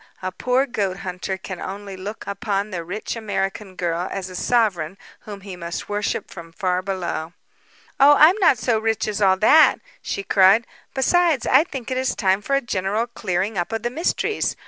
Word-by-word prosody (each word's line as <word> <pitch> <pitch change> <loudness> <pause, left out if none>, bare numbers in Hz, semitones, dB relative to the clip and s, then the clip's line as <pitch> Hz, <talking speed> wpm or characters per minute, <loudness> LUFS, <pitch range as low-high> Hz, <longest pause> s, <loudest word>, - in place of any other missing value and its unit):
A 185 - -2
poor 255 +7 +1
goat 200 -7 -2
hunter 185 +1 -4
can 190 -1 -8
only 200 0 -6
look 200 +4 -7
upon 200 0 -2
the 175 -2 -4
rich 190 +8 -5
American 195 -3 -3
girl 175 0 -2
as 190 -1 -5
a - - -8
sovereign 195 -6 0 0.3
whom 205 -2 -8
he 195 -1 -8
must 170 -1 -6
worship 205 0 -2
from 165 -2 -10
far 185 -1 0
below." 180 -4 -4 0.7
"Oh, 285 +2 +8
I'm 320 +5 +7
not 350 -9 +5
so 225 0 +1
rich 225 -1 -1
as 210 0 -3
all 190 -1 +4
that," 300 +11 +6 0.3
she 200 - -4
cried. 195 +4 +5 0.3
"Besides, 315 0 +2
I - - +5
think 265 -6 -7
it 255 - 0
is 260 - -1
time 195 -1 +1
for 275 +5 0
a 275 - +2
general 205 0 -1
clearing 200 -3 -2
up 175 - -3
of 225 0 -3
the 240 - -1
mysteries. 345 - -1
200 Hz, 190 wpm, -22 LUFS, 185-235 Hz, 0.7 s, Oh